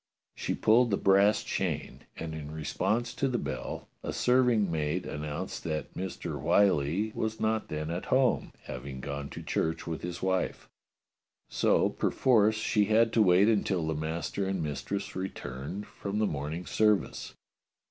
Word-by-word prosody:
She - - -2
pulled 120 +3 +4
the 100 - +1
brass 100 +2 +4
chain, - - -3
and 80 -1 -5
in 75 -2 -6
response 105 +10 -1
to 140 - 0
the 125 -2 0
bell - - -5
a - - -4
serving 125 -6 +3
maid 80 +3 -1
an 75 - -5
nounced 75 +5 -4
that 80 -2 -4
Mr. 90 -5 -5
Whyllie 90 +2 +3
was 110 0 -2
not 110 0 0
then 75 +1 -3
at 85 +2 -3
home, 130 0 +2
hav 65 +2 -7
ing 65 -1 -6
gone 70 +1 -5
to - - -8
church 80 0 -1
with 80 -2 -4
his 90 0 -5
wife. 95 0 -1 0.8
So - - +3
perforce 110 -4 +3
she 105 -1 +2
had 115 +2 +3
to 115 - +4
wait 95 0 +5
until 100 -6 +1
the 80 - 0
master 80 +5 -3
and 95 -3 -1
mistress 90 +7 -4
returned 95 0 -5
from 100 +1 -5
the 110 - +2
morning 80 +1 -3
service. 105 -3 +1
95 Hz, 160 wpm, -29 LUFS, 80-110 Hz, 0.8 s, wait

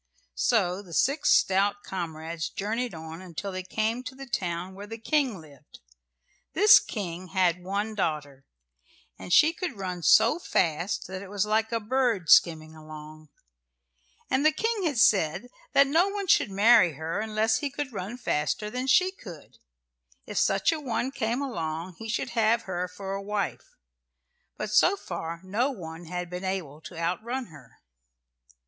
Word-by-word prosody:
So 180 - +2
the 175 -5 -9
six 280 +5 +2
stout 200 +2 +3
comrades 165 -3 -5
journeyed 225 +1 -3
on 160 +1 -8
until 185 +2 -6
they 185 0 -4
came 220 +5 -2
to 255 +2 -7
the 275 +1 -9
town 180 -5 -3
where 200 +2 -9
the 225 +1 -7
King 255 - 0
lived. 150 -2 -16 0.7
This 420 +2 +8
King 185 -4 -6
had 180 0 +1
one 200 +4 -2
daughter, 150 -8 -3 0.8
and - - -8
she 305 - +6
could 340 - -5
run 180 -2 -4
so 155 - +5
fast 175 - 0
that 185 0 -6
it 200 - -10
was 205 0 0
like 220 +1 +1
a 230 - 0
bird 225 - 0
skimming 160 -2 +4
along, 155 0 -11 1.0
and 265 +2 +1
the 310 - +6
King 440 +4 -1
had 290 -5 -2
said 205 +1 +3 0.2
that 280 - +6
no 325 +7 +3
one 400 0 -3
should 320 - +3
marry 205 -2 +5
her 160 +6 -4
unless 220 +1 +1
he 290 - -2
could 275 -2 -5
run 200 +4 -5
faster 210 +1 -1
than 250 +2 -3
she 365 +7 +4
could; 180 - -13 0.7
if - - -2
such - - +2
a 325 - -2
one 260 -2 -2
came 235 +2 -1
along 170 - -4
he 225 - -7
should 215 - -2
have 230 0 +2
her 180 -1 -3
for 190 +2 -7
a 195 - -3
wife. 205 0 -4 0.8
But 215 0 -4
so 355 - +4
far 170 - -6
no 215 +8 0
one 170 - -8
had 180 +1 -4
been 180 +2 -6
able 180 -6 -4
to 175 - -9
outrun 220 +9 -3
her. 135 -6 -16
195 Hz, 165 wpm, -27 LUFS, 170-240 Hz, 1.0 s, This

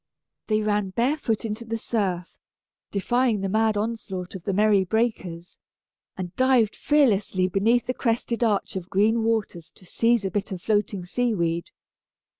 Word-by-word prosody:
They 215 -1 +2
ran 210 -2 0
barefoot 235 0 0
into 220 +1 -4
the 230 0 -3
surf, 190 -6 -2 0.5
defying 235 +1 +1
the 195 - -1
mad 220 +1 +2
onslaught 205 -4 -4
of 185 -3 -9
the 200 - 0
merry 205 0 +4
breakers, 185 -5 -2 0.6
and 180 -2 -6
dived 255 -4 +3
fearlessly 210 -10 +2
beneath 225 +6 +2
the 255 - -1
crested 235 -1 -1
arch 210 -4 0
of 185 -1 -5
green 220 +4 +2
waters 215 -7 -1
to 185 - -19
seize 230 +2 +1
a 190 - -1
bit 205 -1 -2
of 185 - -4
floating 205 -2 -1
seaweed. 175 -6 -1
210 Hz, 150 wpm, -25 LUFS, 190-230 Hz, 0.6 s, merry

